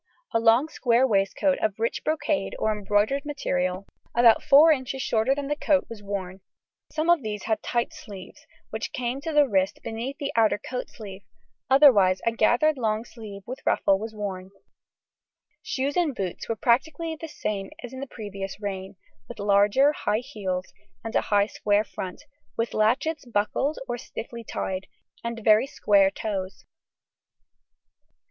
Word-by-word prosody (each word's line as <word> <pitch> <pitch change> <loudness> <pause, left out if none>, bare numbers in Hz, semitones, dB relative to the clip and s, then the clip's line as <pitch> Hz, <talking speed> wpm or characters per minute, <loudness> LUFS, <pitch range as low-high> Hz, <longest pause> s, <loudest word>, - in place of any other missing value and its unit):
A 230 - +3
long 230 +5 +4
square 250 -4 +2
waistcoat 210 +5 +1
of 210 -2 -1
rich 230 +1 -2
brocade 305 -7 -1
or 220 - +1
embroidered 210 +6 +1
material, 185 -10 -2 0.3
about 235 -1 +6
four 300 +3 +7
inches 265 -2 -1
shorter 230 +4 +2
than 285 -1 -4
the 295 - 0
coat, 295 -1 +2
was 220 -3 -8
worn; 195 -2 -5 0.5
some 310 +1 -1
of 345 -3 +5
these 210 -3 -5
had 220 -1 -1
tight 235 -1 -1
sleeves, 195 -3 -11 0.2
which - - -4
came 255 +1 -2
to 320 - -3
the 295 -2 +5
wrist 190 -4 +1
beneath 235 +5 -5
the 280 - -3
outer 220 -2 +4
coat 250 +3 -6
sleeve; 200 -4 -10 0.5
otherwise 240 -10 +6
a 230 - +3
gathered 245 +6 +2
lawn 220 -1 0
sleeve 210 -5 -10
with 255 +2 -6
ruffle 195 -1 +2
was 220 +1 -6
worn. 190 -3 -5 1.1
Shoes 285 -10 -2
and 330 -7 +1
boots 190 -5 -4
were 230 - 0
practically 315 +8 +1
the 325 +1 -8
same 200 -9 -4
as 245 +1 -8
in 260 - -7
the 275 - -5
previous 200 -5 -7
reign, 195 -2 -5 0.3
with - - -8
larger 205 +7 +4
high 215 -6 -1
heels 190 -9 -4 0.3
and 225 +1 -5
a - - +4
high 205 -1 +2
square 205 0 +1
front, 185 -4 -7 0.3
with 230 0 -1
latchets 260 +9 +1
buckled 225 +8 0
or 240 0 -3
stiffly 235 +1 -8
tied, 190 -3 -4 0.4
and 235 -1 -5
very 215 +4 +5
square 200 -7 +3
toes. 195 -2 -5
225 Hz, 160 wpm, -26 LUFS, 200-270 Hz, 1.1 s, four